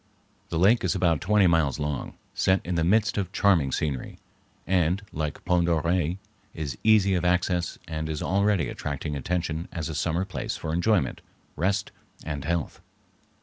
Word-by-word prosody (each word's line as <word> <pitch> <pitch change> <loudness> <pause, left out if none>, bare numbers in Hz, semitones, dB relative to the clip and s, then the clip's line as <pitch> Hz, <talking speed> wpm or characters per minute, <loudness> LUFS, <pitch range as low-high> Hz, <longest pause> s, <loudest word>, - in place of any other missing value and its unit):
The 85 - -2
lake 100 +8 +4
is 90 - +1
about 85 -4 +2
twenty 105 0 +4
miles 80 -5 +3
long, 75 -3 -3 0.2
set 95 0 +2
in 90 - -2
the 85 -1 +1
midst 105 +4 +2
of 95 -2 -3
charming 90 -10 +3
scenery, 70 -2 -2 0.5
and, 90 +1 +1
like 75 -1 -4
Pend 90 -1 +2
d'Oreille, 85 +1 +1 0.4
is 75 -5 -4
easy 105 -3 +5
of 90 -2 0
access 90 -1 +1
and 80 -1 -4
is 75 -1 -3
already 100 -5 +2
attracting 75 +3 -4
attention 85 +2 -2
as 80 -1 -4
a - - -4
summer 85 +4 0
place 95 - -4
for 80 - -4
enjoyment, 90 - +1 0.3
rest, 95 +3 0 0.3
and 75 -2 -4
health. 85 0 -2
85 Hz, 160 wpm, -26 LUFS, 80-95 Hz, 0.5 s, easy